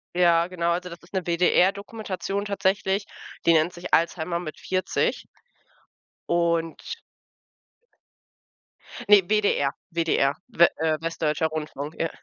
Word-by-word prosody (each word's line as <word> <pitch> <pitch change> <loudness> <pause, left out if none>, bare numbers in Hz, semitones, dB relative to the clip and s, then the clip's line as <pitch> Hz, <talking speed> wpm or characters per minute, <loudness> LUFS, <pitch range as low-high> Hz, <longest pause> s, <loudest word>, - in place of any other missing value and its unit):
Ja, 170 -1 +4
genau, 170 -2 -1
also 180 +1 -2
das 170 0 -10
ist 170 - -20
'ne 190 -3 -2
WDR-Dokumentation 195 +3 0
tatsächlich, 200 0 0 0.4
die 170 - +6
nennt 160 +2 +3
sich 175 0 -9
Alzheimer 170 +1 +1
mit 155 -3 -7
40. 185 0 -1 1.0
Und 170 - -1 2.1
Ne, 205 -1 +9
WDR 205 -10 +2 0.2
WDR, 165 -4 +1 0.2
W 170 -7 +5
Äh, 160 0 +1
Westdeutscher 160 -1 0
Rundfunk, 155 -1 -5
ja. 165 - 0
170 Hz, 115 wpm, -25 LUFS, 165-190 Hz, 2.1 s, Ne